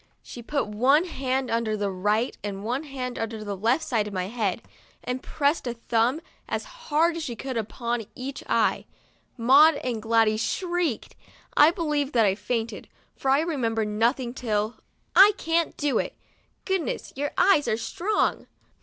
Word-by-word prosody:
She 240 - -9
put 280 +4 -1
one 260 +10 +3
hand 265 -6 -2
under 225 -2 0
the 205 -1 -1
right 210 +6 0
and 200 -1 -5
one 250 +7 -2
hand 255 -3 -5
under 225 -1 -4
the 205 -1 -4
left 230 - +1
side 225 -7 0
of 205 - -7
my 185 0 -2
head, 215 -3 -2 0.4
and 250 +1 -3
pressed 285 -1 0
a 240 - -3
thumb, 235 +5 0 0.3
as - - -2
hard 335 -9 0
as 330 - -4
she 245 -6 -4
could, 260 +3 -5
upon 235 0 -3
each 265 +1 -6
eye. - - +2 0.5
Maud 280 +7 +6
and 240 -4 -2
Gladys 225 -1 +2
shrieked. 350 - -2 0.4
I 295 - +7
believe 300 -5 -1
that 230 -3 +4
I 195 - +3
fainted, 225 +2 -3 0.3
for 270 - -2
I 275 +2 +4
remember 235 -9 -1
nothing 235 +4 0
till, 220 -3 -2 0.4
"I 410 +2 +9
can't 330 0 0
do 290 -2 +1
it. - - -3 0.5
Goodness, 380 -5 -2
your 290 +2 -1
THURSDAY— - - +1
SPANKED 395 +2 +6
eyes 295 - +1
are 220 - +1
strong.' 360 - -1
250 Hz, 170 wpm, -25 LUFS, 225-295 Hz, 0.5 s, I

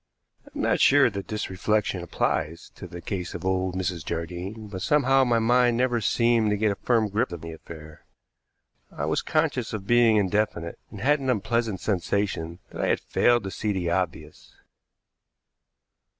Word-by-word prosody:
I - - -15
am - - -3
not - - +2
sure 140 -3 +5
that 100 -1 -6
this 105 -2 -4
reflection 100 -1 0
applies 85 -1 -2
to 90 - -9
the 85 0 -9
case 90 -3 -4
of 85 - -6
old 95 -1 0
Mrs. 90 -3 -2
Jardine, 90 +7 -5
but 95 -2 -7
somehow 135 +2 +3
my 120 -2 +2
mind 120 +1 +3
never 120 -2 +1
seemed 115 +1 +2
to 105 - +1
get 105 0 +2
a - - -2
firm 115 -3 +2
grip 105 -2 -1
of 85 -2 -6
the 85 0 -7
affair. 80 -1 -12 0.9
I - - -4
was - - 0
conscious 150 -8 0
of 105 -3 -4
being 120 -1 +4
indefinite, 100 -4 -1
and 100 - -9
had 145 +5 +3
an 135 -1 -3
unpleasant 115 -3 0
sensation 90 -3 -1
that - - -5
I - - +1
had - - +2
failed 120 -2 +2
to 95 - -5
see 105 +1 -2
the 90 -3 -1
obvious. 90 -2 -4
105 Hz, 180 wpm, -25 LUFS, 90-120 Hz, 0.9 s, sure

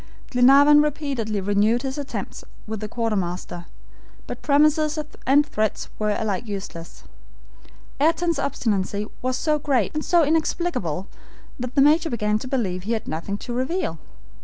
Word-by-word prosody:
Glenarvan 280 +4 +7
repeatedly 275 -8 -2
renewed 205 +5 +2
his 270 +1 -3
attempts 280 - -6 0.2
with 220 0 -5
the 215 - -4
quartermaster, 185 -6 -3 0.6
but - - -7
promises 305 +2 +3 0.3
and 285 +2 +5
threats 215 -7 -2
were 215 0 0
alike 220 +2 -2
useless. 190 -5 -7 1.0
Ayrton's 330 +1 +2
obstinacy 210 -7 -1 0.2
was 255 0 -1
so 305 +1 +1
great, 270 -7 0
and 305 0 -2
so 345 -1 +4
inexplicable, 305 - -1 0.5
that 250 0 -5
the 275 - +5
Major 315 +3 +4
began 210 -3 0
to 255 - -7
believe 205 -9 -1
he 215 +5 -2
had 220 - -3
nothing 170 +6 -3
to 240 - -6
reveal. 255 - -2
245 Hz, 140 wpm, -23 LUFS, 205-295 Hz, 1.0 s, Glenarvan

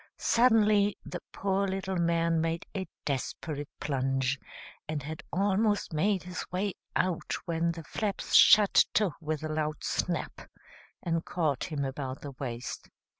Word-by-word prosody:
Suddenly 215 -4 +4
the 175 - -6
poor 195 0 0
little 190 0 -2
man 170 -1 +2
made 165 +1 -1
a 190 -1 -2 0.2
desperate 145 +1 -3
plunge, 135 -1 0 0.5
and 155 -3 -3
had 155 +2 -6
almost 200 0 +1
made 190 +4 +1
his 180 0 -5
way 190 +2 -1 0.2
out 180 -2 0
when 170 0 0
the 165 -1 -8
flaps 205 +4 -3
shut 210 -2 +8 0.2
to 205 -4 +3
with 155 -1 -3
a - - -1
loud 155 -1 -2
snap - - -2 0.6
and 165 -1 0
caught 155 -6 -1
him 145 -3 -2
about 135 0 -4
the 145 - -6
waist. 125 -3 -6
165 Hz, 140 wpm, -29 LUFS, 145-195 Hz, 0.6 s, shut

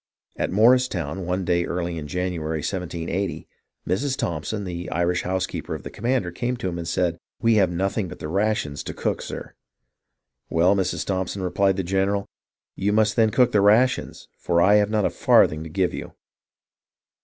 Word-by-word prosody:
At - - -1
Morristown, 95 - +2
one 90 +1 -1
day 85 0 +2
early 85 -1 -3
in 75 - -7
January, 80 -2 -2
1780, 90 -2 -3 0.4
Mrs. 130 +8 0
Thompson, 85 +6 -3
the 90 -1 -5
Irish 85 +1 0
house 95 0 -1
keeper - - -5
of - - -8
the - - -7
commander, 120 -5 -1
came 120 +7 -2
to 120 - -3
him 85 -1 -3
and 85 - -5
said, 85 0 0
" - - -70
We 115 0 +5
have 95 -3 +4
nothing 95 +3 -1
but - - -9
the - - -6
rations 95 -5 -1
to - - -5
cook, - - -1
sir." - - -7 1.0
"Well, 90 +4 +3
Mrs. 95 -2 -1
Thompson," 95 0 -2
replied 95 +1 +1
the 95 - -1
general, 95 +2 0 0.5
"you 100 +2 0
must 105 0 +2
then 110 -1 +4
cook 125 +2 +3
the 105 - +3
rations, 115 +6 +2
for 85 -1 +1
I 100 +4 +6
have 105 -1 +2
not 105 -2 +1
a - - +1
farthing 75 0 +4
to - - -7
give 90 +3 0
you." - - -7
95 Hz, 185 wpm, -24 LUFS, 85-105 Hz, 1.0 s, I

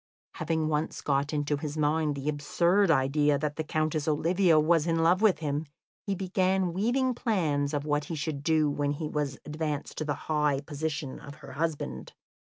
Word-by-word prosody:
Having 160 0 0
once 155 0 -1
got 140 0 0
into 145 -1 0
his 150 +1 -5
mind 150 0 +1
the 140 +1 -6
absurd 170 +6 +2
idea 145 0 +3
that 150 0 -2
the 160 - -2
Countess 155 0 -1
Olivia 165 +2 +3
was 160 +1 +3
in 165 -1 +2
love 180 +4 +4
with 215 -5 +4
him, 150 0 -2 0.4
he 200 - 0
began 185 -1 0
weaving 250 +7 +1
plans 155 -12 0
of 145 -1 -2
what 150 -1 0
he 165 - -4
should 150 -1 -3
do 155 0 +2
when 145 0 0
he 150 +1 -4
was 145 -3 -2
advanced 150 -1 -4
to - - -1
the 145 -1 -1
high 150 -3 +1
position 145 -1 -4
of 140 0 -10
her - - -12
husband. 140 - -3
155 Hz, 185 wpm, -28 LUFS, 145-165 Hz, 0.4 s, love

